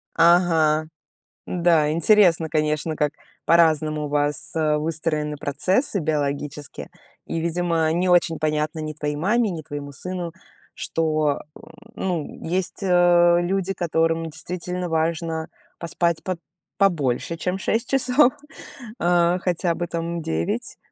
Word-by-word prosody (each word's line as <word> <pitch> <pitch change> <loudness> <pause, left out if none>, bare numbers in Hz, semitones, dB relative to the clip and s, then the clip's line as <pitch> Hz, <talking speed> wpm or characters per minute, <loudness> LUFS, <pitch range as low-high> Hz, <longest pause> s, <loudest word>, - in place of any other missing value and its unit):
Ага. 165 -3 +4 0.6
Да, 170 -4 +2
интересно, 170 0 +4
конечно, 155 0 0
как 150 -1 0 0.3
по-разному 155 -2 +3
у - - -3
вас, 145 0 -1
э, 155 -1 +2
выстроены 155 -1 -2
процессы 185 - 0
биологические. 145 -2 -3 0.4
И, 165 - -3
видимо, 165 -1 0
не 175 +3 0
очень 175 -2 +3
понятно 155 0 -1
ни 155 0 -4
твоей 150 -1 -3
маме, 210 +8 +1
ни 170 -3 -5
твоему 145 -2 -7
сыну, 175 +4 -5 0.4
что, 155 -3 0
м, - - -13 0.3
ну, 175 -5 -4
есть, 180 +4 -2
э, 175 -2 +5
люди, 190 +2 -1
которым 165 -2 0
действительно 180 +3 -4
важно 160 0 -1 0.3
поспать 170 0 -1
по 185 -2 -3 0.4
побольше, 165 -5 +1
чем 180 +3 -2
6 230 +5 -1
часов. 260 0 +4 0.7
Хотя 175 0 +1
бы, 175 +1 -2
там, 170 0 -3
9. 80 - -2
165 Hz, 120 wpm, -23 LUFS, 155-175 Hz, 0.7 s, э